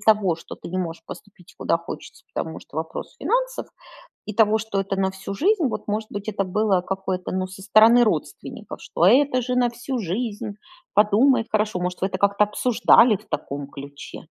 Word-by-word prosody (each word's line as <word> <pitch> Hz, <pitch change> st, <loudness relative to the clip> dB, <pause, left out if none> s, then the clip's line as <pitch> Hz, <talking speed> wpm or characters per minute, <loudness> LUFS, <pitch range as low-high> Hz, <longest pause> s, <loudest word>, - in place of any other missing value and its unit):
того, 210 Hz, -5 st, +3 dB
что 165 Hz, -, -10 dB
ты -, -, -10 dB
не 185 Hz, -, -2 dB
можешь 165 Hz, -2 st, -4 dB
поступить 195 Hz, -3 st, -12 dB
куда -, -, +1 dB
хочется, 170 Hz, 0 st, -10 dB
потому 160 Hz, 0 st, -4 dB
что -, -, -14 dB
вопрос 160 Hz, 0 st, -6 dB
финансов, -, -, -1 dB, 0.6 s
и 215 Hz, -, -5 dB
того, 220 Hz, 0 st, +4 dB
что 220 Hz, -2 st, -2 dB
это 195 Hz, 0 st, -2 dB
на 190 Hz, 0 st, +1 dB
всю 190 Hz, +1 st, -7 dB
жизнь, 370 Hz, -, +2 dB
вот, 245 Hz, -, -4 dB
может 215 Hz, +1 st, -2 dB
быть, 205 Hz, +1 st, -6 dB
это 200 Hz, -2 st, -1 dB
было 190 Hz, 0 st, +1 dB
какое-то, 190 Hz, -1 st, -3 dB
ну, 185 Hz, 0 st, -1 dB
со 190 Hz, +1 st, -11 dB
стороны 220 Hz, +4 st, +6 dB
родственников, 215 Hz, -, -4 dB
что -, -, -1 dB
"это 265 Hz, -1 st, +4 dB
же 250 Hz, +1 st, -2 dB
на 245 Hz, -1 st, +3 dB
всю 245 Hz, +2 st, -4 dB
жизнь, 210 Hz, +1 st, -3 dB, 0.4 s
подумай 225 Hz, +4 st, +4 dB
хорошо". 210 Hz, -3 st, 0 dB
Может, 180 Hz, 0 st, -3 dB
вы 190 Hz, -, +2 dB
это 185 Hz, -, -4 dB
как-то 200 Hz, +1 st, +3 dB
обсуждали 225 Hz, +1 st, +4 dB
в 210 Hz, +3 st, -18 dB
таком 145 Hz, -3 st, -4 dB
ключе? 140 Hz, +2 st, -10 dB
205 Hz, 190 wpm, -23 LUFS, 185-230 Hz, 0.6 s, стороны